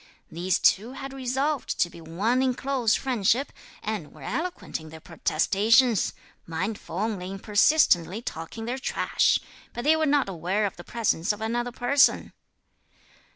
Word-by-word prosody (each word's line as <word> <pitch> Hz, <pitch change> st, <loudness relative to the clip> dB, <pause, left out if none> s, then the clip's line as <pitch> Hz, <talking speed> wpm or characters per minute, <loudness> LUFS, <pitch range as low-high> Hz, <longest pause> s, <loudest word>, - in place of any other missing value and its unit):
These 180 Hz, +2 st, 0 dB
two 225 Hz, +6 st, +2 dB
had 270 Hz, 0 st, -7 dB
resolved 270 Hz, +2 st, -2 dB
to -, -, +4 dB
be 170 Hz, -1 st, -13 dB
one 200 Hz, +11 st, 0 dB
in 260 Hz, -1 st, +1 dB
close 255 Hz, -5 st, +1 dB
friendship, 250 Hz, +1 st, 0 dB, 0.3 s
and -, -, -4 dB
were -, -, -14 dB
eloquent 360 Hz, 0 st, -4 dB
in 160 Hz, 0 st, -11 dB
their 160 Hz, +1 st, -11 dB
protestations, 215 Hz, -, +2 dB, 0.3 s
mindful 180 Hz, +2 st, -4 dB
only 200 Hz, -3 st, -2 dB
in 195 Hz, -, -5 dB
persistently 205 Hz, -, +3 dB
talking 225 Hz, +1 st, -6 dB
their 250 Hz, +3 st, -3 dB
trash, -, -, +2 dB, 0.4 s
but 240 Hz, -, -5 dB
they 310 Hz, +2 st, +5 dB
were 315 Hz, -1 st, +1 dB
not 285 Hz, -4 st, +2 dB
aware 190 Hz, +3 st, -1 dB
of 195 Hz, -, -3 dB
the 175 Hz, -, -10 dB
presence 215 Hz, -6 st, 0 dB
of 210 Hz, -, -5 dB
another 240 Hz, +2 st, -2 dB
person." 245 Hz, +4 st, +2 dB
225 Hz, 155 wpm, -26 LUFS, 185-260 Hz, 0.4 s, they